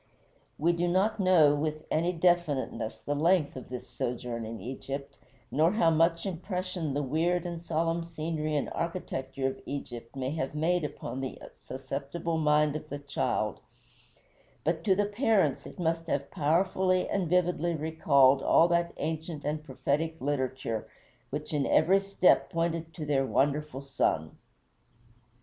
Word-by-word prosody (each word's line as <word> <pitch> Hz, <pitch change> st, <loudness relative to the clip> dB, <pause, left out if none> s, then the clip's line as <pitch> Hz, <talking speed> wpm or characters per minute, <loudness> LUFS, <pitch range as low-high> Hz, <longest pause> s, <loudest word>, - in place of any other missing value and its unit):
We 170 Hz, +4 st, +2 dB
do 175 Hz, +1 st, 0 dB
not 195 Hz, +5 st, +2 dB
know 175 Hz, -6 st, +5 dB
with 155 Hz, +1 st, -2 dB
any 170 Hz, +3 st, +2 dB
definiteness 160 Hz, -10 st, 0 dB
the 145 Hz, -, -3 dB
length 160 Hz, +1 st, +2 dB
of 130 Hz, -, -8 dB
this 125 Hz, -1 st, -6 dB
sojourn 120 Hz, -1 st, -4 dB
in 115 Hz, 0 st, -6 dB
Egypt, 140 Hz, +2 st, -6 dB, 0.4 s
nor 160 Hz, +6 st, +3 dB
how 170 Hz, -6 st, +4 dB
much 165 Hz, +2 st, +2 dB
impression 180 Hz, -4 st, -3 dB
the 145 Hz, -, 0 dB
weird 165 Hz, +6 st, +1 dB
and 170 Hz, -1 st, -5 dB
solemn 165 Hz, +1 st, 0 dB
scenery 155 Hz, -2 st, -3 dB
and 145 Hz, -, 0 dB
architecture 135 Hz, -6 st, -3 dB
of 135 Hz, 0 st, -2 dB
Egypt 120 Hz, -3 st, -6 dB
may 130 Hz, 0 st, -2 dB
have 150 Hz, -2 st, -3 dB
made 170 Hz, +3 st, +1 dB
upon 135 Hz, -2 st, -5 dB
the 130 Hz, -, -5 dB, 0.2 s
susceptible 140 Hz, +5 st, -4 dB
mind 150 Hz, -1 st, +3 dB
of 155 Hz, 0 st, -6 dB
the 145 Hz, -, -4 dB
child; 130 Hz, -6 st, -1 dB, 1.0 s
but 165 Hz, +1 st, 0 dB
to 190 Hz, -, +4 dB
the 205 Hz, +2 st, +2 dB
parents 210 Hz, 0 st, +1 dB
it -, -, -12 dB
must 165 Hz, -1 st, -1 dB
have 140 Hz, -3 st, -2 dB
powerfully 185 Hz, +3 st, +2 dB
and 185 Hz, -5 st, -1 dB
vividly 175 Hz, -1 st, +2 dB
recalled 140 Hz, -4 st, +4 dB
all 165 Hz, -, +5 dB
that 170 Hz, 0 st, +1 dB
ancient 160 Hz, -1 st, -4 dB
and 150 Hz, +1 st, -2 dB
prophetic 155 Hz, +4 st, -1 dB
literature 130 Hz, -5 st, -2 dB, 0.4 s
which 150 Hz, +3 st, -5 dB
in 145 Hz, -2 st, +1 dB
every 185 Hz, +5 st, +5 dB
step 195 Hz, -2 st, +3 dB
pointed 165 Hz, -1 st, -1 dB
to 155 Hz, -, -5 dB
their 140 Hz, -2 st, +2 dB
wonderful 145 Hz, 0 st, 0 dB
son. 105 Hz, -12 st, 0 dB
155 Hz, 150 wpm, -29 LUFS, 140-170 Hz, 1.0 s, know